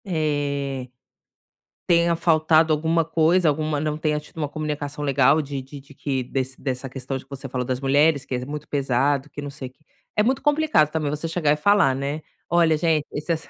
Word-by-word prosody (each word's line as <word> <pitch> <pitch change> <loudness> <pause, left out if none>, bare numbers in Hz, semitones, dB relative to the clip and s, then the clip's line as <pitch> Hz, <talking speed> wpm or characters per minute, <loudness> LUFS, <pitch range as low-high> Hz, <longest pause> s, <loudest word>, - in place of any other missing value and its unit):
É, 145 -6 -2 1.0
tenha 170 0 +3
faltado 160 -1 +3
alguma 160 +2 +1
coisa, 165 +2 +3
alguma 155 0 0
não 150 0 -2
tenha 155 -1 0
tido 150 - -17
uma 150 -3 -2
comunicação 150 -1 -4
legal 140 +2 +4
de 140 -2 -5
de 135 +2 -11
de 140 +1 -17
que 135 -1 -2
desse 130 +1 -4
dessa 130 -1 -3
questão 130 +1 -5
de 130 - -10
que 135 - -34
você 140 -1 -7
falou 125 -1 -3
das 130 0 -2
mulheres, 140 +2 +3
que 130 - -3
é 125 0 -4
muito 150 +2 -6
pesado, 140 +1 0
que 145 - -8
não 145 - -5
sei 140 -2 -8
que. 130 - -31 0.4
É - - +5
muito 260 +4 +1
complicado, 295 - +3
também, 155 -2 -1
você 150 +3 -3
chegar 160 -3 +2
e - - +1
falar, 150 -4 +3
né: 140 +3 -3 0.3
"Olha 165 -2 +3
gente, 155 -2 +1
esse 150 +3 -3
essa 165 -1 -2
150 Hz, 205 wpm, -23 LUFS, 135-160 Hz, 1.0 s, É